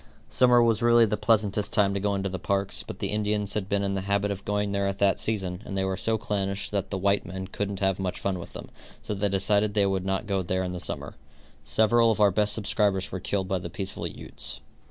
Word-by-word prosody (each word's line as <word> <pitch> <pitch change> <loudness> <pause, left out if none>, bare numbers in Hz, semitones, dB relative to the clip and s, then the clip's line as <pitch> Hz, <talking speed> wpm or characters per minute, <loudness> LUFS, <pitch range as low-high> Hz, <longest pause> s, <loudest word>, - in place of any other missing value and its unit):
Summer 125 -1 +5
was 115 -1 +2
really 120 0 +6
the 105 - 0
pleasantest 105 -2 +1
time 100 -2 +3
to 100 - -1
go 100 0 0
into 95 0 -1
the 95 -1 -4
parks, 100 +2 +1
but - - -8
the - - -2
Indians 105 -1 0
had 100 -2 -3
been 100 0 +1
in 100 0 -1
the 95 - -1
habit 100 +1 0
of 100 -1 -5
going 105 0 -1
there 100 0 0
at 100 0 -2
that 100 -1 +2
season, 95 -4 -2
and 95 - -5
they 95 - +1
were 95 0 -1
so 110 +3 0
clannish 100 -1 -2
that 100 -2 -2
the 100 - -2
white 100 +1 +2
men 95 +1 -6
couldn't 100 0 -4
have 95 -1 +1
much 95 -1 -3
fun 95 -2 -2
with 85 - -10
them, - - -9 0.3
so - - -3
they 100 0 0
decided 100 +2 +2
they 100 -1 +4
would 95 -1 0
not 95 +2 -1
go 100 -2 0
there 95 +1 -1
in 90 -1 -3
the 90 - -4
summer. - - -4 0.5
Several 110 - +4
of 110 - +1
our 105 -1 +5
best 105 +2 +1
subscribers 100 -2 0
were 95 - -4
killed 95 +1 -2
by 95 -1 0
the 85 - -6
peaceful 95 +3 -4
Utes. - - -5
100 Hz, 250 wpm, -26 LUFS, 95-105 Hz, 0.5 s, really